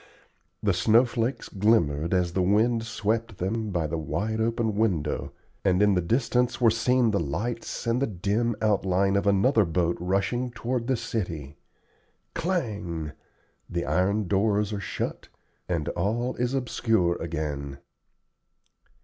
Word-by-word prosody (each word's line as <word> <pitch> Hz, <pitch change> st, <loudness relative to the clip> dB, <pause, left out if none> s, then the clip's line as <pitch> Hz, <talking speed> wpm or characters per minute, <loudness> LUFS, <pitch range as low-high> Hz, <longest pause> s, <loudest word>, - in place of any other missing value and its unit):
The -, -, +3 dB
snow 115 Hz, +3 st, +4 dB
flakes 120 Hz, +2 st, -2 dB
glimmered 85 Hz, -7 st, +2 dB
as 90 Hz, -2 st, +1 dB
the 95 Hz, -, +1 dB
wind 110 Hz, +5 st, +2 dB
swept 115 Hz, -2 st, -2 dB
them 110 Hz, +4 st, -2 dB
by 85 Hz, -5 st, -1 dB
the 80 Hz, +1 st, -2 dB
wide 100 Hz, +9 st, -2 dB
open 115 Hz, -1 st, 0 dB
window, 100 Hz, -8 st, 0 dB, 0.3 s
and 95 Hz, -1 st, +3 dB
in 105 Hz, -1 st, +4 dB
the 90 Hz, -, +2 dB
distance 120 Hz, +4 st, +1 dB
were 115 Hz, -3 st, +5 dB
seen 120 Hz, +1 st, +2 dB
the 100 Hz, -, +1 dB
lights 105 Hz, -, -3 dB
and 115 Hz, +2 st, +1 dB
the 140 Hz, -, +2 dB
dim 105 Hz, +4 st, 0 dB
outline 95 Hz, -2 st, +2 dB
of 100 Hz, +1 st, +1 dB
another 105 Hz, +4 st, +4 dB
boat 85 Hz, 0 st, 0 dB
rushing 100 Hz, +8 st, 0 dB
toward 120 Hz, 0 st, -3 dB
the 130 Hz, -2 st, +1 dB
city. 80 Hz, -12 st, -4 dB, 0.8 s
Clang! 105 Hz, -, -2 dB, 0.6 s
the 85 Hz, -1 st, -2 dB
iron 100 Hz, +3 st, +1 dB
doors 105 Hz, +1 st, +1 dB
are 100 Hz, -, -2 dB
shut, 95 Hz, -, -4 dB, 0.4 s
and 85 Hz, -4 st, -1 dB
all 115 Hz, +7 st, -1 dB
is 125 Hz, +2 st, 0 dB
obscure 115 Hz, -8 st, +1 dB
again. 75 Hz, -4 st, -4 dB
105 Hz, 140 wpm, -26 LUFS, 90-115 Hz, 0.8 s, were